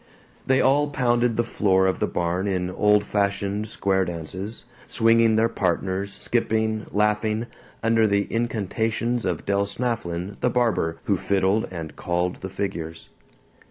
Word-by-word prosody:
They 130 0 +4
all 145 +3 +3
pounded 120 -3 +1
the 120 - +3
floor 95 -4 +2
of 95 - +1
the - - +1
barn 90 +3 -1
in 90 -2 -1
old 105 +2 +3
fashioned 100 +1 -1
square 95 -2 +1
dances, 90 +5 -6 0.2
swinging 115 -1 +4
their 110 +1 +4
partners, 95 0 -1
skipping, 110 -1 -1
laughing, 105 +2 +1 0.4
under 115 -1 +4
the 100 0 +2
incantations 115 +1 -1
of 90 -4 -2
Del 100 0 +1
Snafflin 100 -6 -3
the 125 - +2
barber, 115 -9 +1
who 100 - +1
fiddled 100 +3 +1
and 80 -4 -7
called 90 +1 -1
the 95 - -7
figures. 85 -5 -5
100 Hz, 140 wpm, -24 LUFS, 95-115 Hz, 0.4 s, They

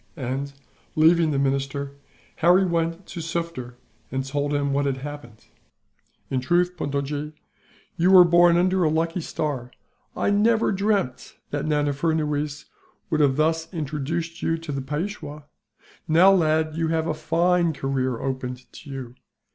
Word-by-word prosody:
And, 135 +1 -3 0.4
leaving 160 +1 +5
the 145 - 0
minister, 140 +1 -1 0.5
Harry 180 +3 +5
went 170 +1 -1
to 175 - -8
Sufder 165 -7 -4 0.4
and 135 0 -2
told 145 +1 -2
him 140 -1 0
what 140 0 +1
had 135 -1 -1
happened. 135 -5 -9 0.9
"In 130 - +1
truth, 175 +6 +1
Puntojee, 145 +1 -3 0.6
you 175 +2 +3
were 185 -1 +9
born 175 0 +5
under 185 +1 +2
a 155 - +3
lucky 165 +3 0
star. 145 -6 -3 0.5
I - - +1
never 220 +2 +3
dreamt 195 - -1 0.2
that 145 +1 -2
Nana 145 -1 +1
Furnuwees 150 -1 -1 0.5
would 155 - +1
have 140 -3 +3
thus 160 +2 0
introduced 165 +1 -4
you 165 - 0
to 165 -2 -7
the 135 -1 -3
Peishwa. 150 +1 -5 0.6
Now, 175 +4 +6
lad, 155 -3 +2
you 165 0 0
have 160 0 0
a 160 - -1
fine 170 +2 +1
career 130 -4 -2
opened 130 -1 -4
to 145 - -12
you. 130 -3 -7
155 Hz, 145 wpm, -24 LUFS, 140-170 Hz, 0.9 s, were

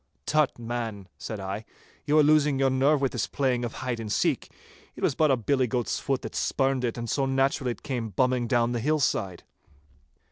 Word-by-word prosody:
'Tut, 155 -2 +2
man,' 115 -4 -4
said 110 -3 -5
I, 95 +3 -4 0.4
'you 150 +1 +3
are 155 - +7
losing 150 -2 +4
your 135 0 +2
nerve 140 +3 +3
with 135 - +1
this - - -2
playing 130 -3 0
of 120 - -3
hide 120 -2 -2
and 110 -2 -5
seek. - - 0 0.5
It - - -9
was - - +3
but 155 +3 +2
a 135 - +3
billy 130 +2 +1
goat's 120 0 -1
foot 135 -2 -2
that - - -6
spurned 135 -1 0
it, 120 0 -1
and 120 0 -4
so 135 +3 0
naturally 135 0 +1
it - - -19
came 120 -4 -3
bumming 125 +4 +1
down 120 0 +2
the 120 - -1
hill 150 +6 +1
side. 95 -10 -1
130 Hz, 210 wpm, -27 LUFS, 115-135 Hz, 0.5 s, are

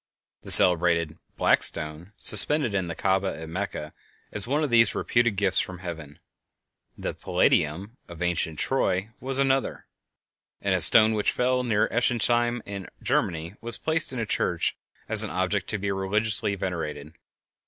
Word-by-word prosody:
The - - -1
celebrated 85 -2 +5 0.2
"black - - +2
stone" 75 +5 +1
suspended 150 -7 +4
in 95 -2 -2
the 85 - -7
Kaaba 95 -3 -2
at 80 - -9
Mecca 85 -3 -7 0.4
is 105 +1 0
one 145 +4 -1
of 145 - -3
these 115 -3 +3
reputed 120 -3 -1
gifts 95 -1 -1
from 95 - -5
heaven; 80 -5 -10 0.8
the - - -6
"Palladium" 95 - -2
of 85 -2 -13
ancient 85 -3 -3
Troy 105 - -2
was 135 0 +1
another; 135 -1 -1 0.7
and - - -2
a - - +2
stone 110 0 +6
which 105 -1 -1
fell 125 +1 -1
near 115 -4 -1
Ensisheim, 120 0 -1
in 100 -3 -8 0.2
Germany, 85 +1 -2
was 120 0 -2
placed 160 -2 +1
in 130 - -5
a 115 - -3
church - - -2 0.3
as - - +8
an - - -5
object - - -3
to - - -4
be 100 0 -4
religiously 100 +1 -2
venerated. 80 -5 -6
100 Hz, 155 wpm, -24 LUFS, 85-120 Hz, 0.8 s, as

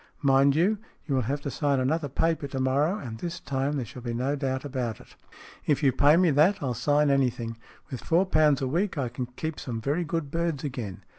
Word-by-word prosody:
Mind 135 0 +4
you, 195 +6 +2 0.3
you 145 - -2
will 130 - +2
have 140 +1 -1
to 140 - -4
sign 140 -2 +1
another 145 +3 0
paper 160 +1 0
to 135 -1 -4
morrow, 140 +8 +1
and 115 - -7
this 170 -1 -4
time 135 0 -2
there 135 -4 -2
shall 125 +3 -10
be 120 -1 -4
no 130 +4 0
doubt 135 -1 -2
about 125 -5 -3
it." - - -17 0.3
" - - -20
If 150 0 +2
you 135 - +5
pay 145 +5 +5
me 180 -2 +4
that, 155 +8 +4
I'll 130 -6 -2
sign 145 +4 +2
anything. 125 -4 0 0.3
With 130 - -5
four 175 +3 +3
pounds 155 -6 +3
a - - 0
week 175 +6 -1
I 130 -4 -1
can 125 +1 -5
keep 150 +5 -5
some 115 -3 -4
very 145 +9 -1
good 165 -3 -3
birds 165 -4 -1
again. 120 - -5
140 Hz, 230 wpm, -27 LUFS, 130-155 Hz, 0.3 s, you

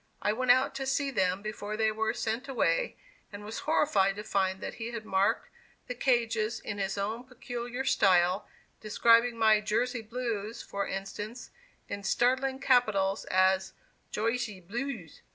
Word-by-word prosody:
I 210 - +1
went 255 +2 -2
out 255 +2 +5
to 270 0 -4
see 275 +1 0
them 190 -4 0
before 215 0 -4
they 220 0 +2
were 220 0 0
sent 230 +5 -3
away, 220 -11 0 0.3
and 205 0 -9
was 215 +2 -5
horrified 200 -12 +3
to 210 - -6
find 190 -2 0
that - - -5
he 225 - -2
had 230 -2 -6
marked 195 -1 +1 0.4
the 250 - -4
cages 230 -3 +1
in 205 - -5
his 195 0 -2
own 215 +4 -2
peculiar 245 0 -5
style, 185 -2 +3 0.3
describing 230 +2 +4
my 220 -1 +5
"Jersey 235 +3 0
Blues," 225 -2 -4
for 200 0 -3
instance, 205 +5 -6 0.4
in 200 - -5
startling 260 +6 +1
capitals 215 -8 +2
as 190 0 +2 0.4
"Gersy 225 -2 -1
Blews." 235 - -5
220 Hz, 155 wpm, -30 LUFS, 200-245 Hz, 0.4 s, out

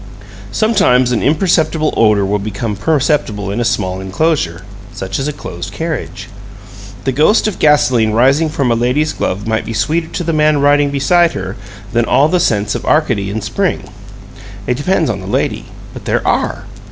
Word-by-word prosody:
Sometimes 130 - +2
an 120 - 0
imperceptible 155 0 +1
odor 105 -3 +3
will 105 +1 0
become 105 +1 -4
perceptible 130 - 0
in 105 - -3
a - - +1
small 95 -5 -1
inclosure, 95 - -1 0.3
such 95 0 -5
as 135 - -2
a - - -1
closed 90 -11 -7
carriage. 160 -5 -5 0.8
The 135 - 0
ghost 155 - +3
of 210 - -4
gasoline 125 -7 +3
rising 135 +8 +3
from 140 -5 0
a - - +3
lady's 125 +7 0
glove 100 +3 -3
might 110 0 -1
be 115 - -6
sweeter 155 +10 0
to 175 - -4
the 165 0 -1
man 155 -1 +3
riding 145 0 +3
beside 165 +5 +2
her 95 - -5 0.4
than 120 -1 +2
all 145 +5 +3
the 180 +1 +2
scents 105 -8 +1
of - - -4
Arcady 120 -11 +1
in 110 +2 -3
spring. 105 - -2 0.7
It 125 - 0
depends 165 +2 +1
on 105 -4 -2
the 95 - -9
lady 100 - -1 0.3
but - - -10
there - - -1
ARE! - - -1
130 Hz, 175 wpm, -15 LUFS, 105-155 Hz, 0.8 s, odor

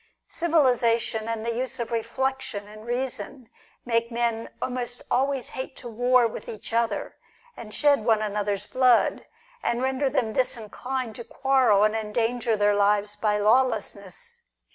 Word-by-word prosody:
Civilisation, 245 -9 +2
and 225 -1 -3
the 235 - -1
use 255 +2 -3
of 235 -1 -3
reflection 235 -2 -2
and 215 +2 -12
reason, 245 -1 -4 0.3
make 230 0 0
men 230 -1 -1
almost 245 -1 -4
always 270 0 0
hate 260 0 -6
to 245 - -9
war 245 +2 +3
with 225 - -5
each 220 +1 -7
other 230 -3 -1 0.4
and 215 -2 -9
shed 285 +1 +3
one 220 -1 +3
another's 205 -1 -2
blood, 250 0 +3 0.3
and 240 +2 -1
render 265 +1 +1
them 230 -4 0
disinclined 250 +1 -2
to 235 - -7
quarrel, 255 -4 +3
and 215 0 +3
endanger 225 +1 0
their 205 0 +3
lives 205 0 +2
by 210 -1 +1
lawlessness. 225 - 0
235 Hz, 140 wpm, -25 LUFS, 215-255 Hz, 0.4 s, war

